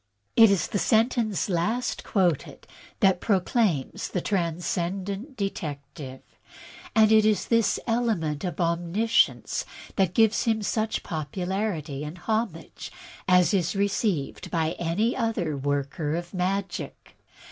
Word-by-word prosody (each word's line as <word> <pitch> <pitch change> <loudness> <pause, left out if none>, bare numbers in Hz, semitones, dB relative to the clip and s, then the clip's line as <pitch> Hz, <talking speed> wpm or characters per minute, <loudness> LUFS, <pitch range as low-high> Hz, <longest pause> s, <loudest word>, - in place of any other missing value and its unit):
It 225 -1 +8
is 195 -5 +2
the 205 - -2
sentence 225 -2 +2
last 210 +7 -1
quoted 180 -7 0 0.4
that 190 -2 +4
proclaims 195 - +1
the 180 - -2
Tran 170 -3 -1
scendent 195 - -3
Detective, 140 - -5 0.7
and 220 -1 +6
it 220 -1 +6
is 215 -1 +2
this 230 -3 +3
element 215 -11 0
of 175 -4 -4
omniscience 175 +6 +1 0.3
that 190 -3 +2
gives 225 -1 +3
him 220 -2 +1
such 220 +2 -1
popularity 165 -1 -3
and 150 +4 -7
homage 215 -3 -3 0.4
as 180 +1 +5
is 185 -1 +1
received 195 -6 -1
by 160 -2 0
any 180 +8 0
other 220 - -1
worker 145 +2 -1
in 175 +1 -3
magic. 190 +2 -3
190 Hz, 120 wpm, -26 LUFS, 165-215 Hz, 0.7 s, It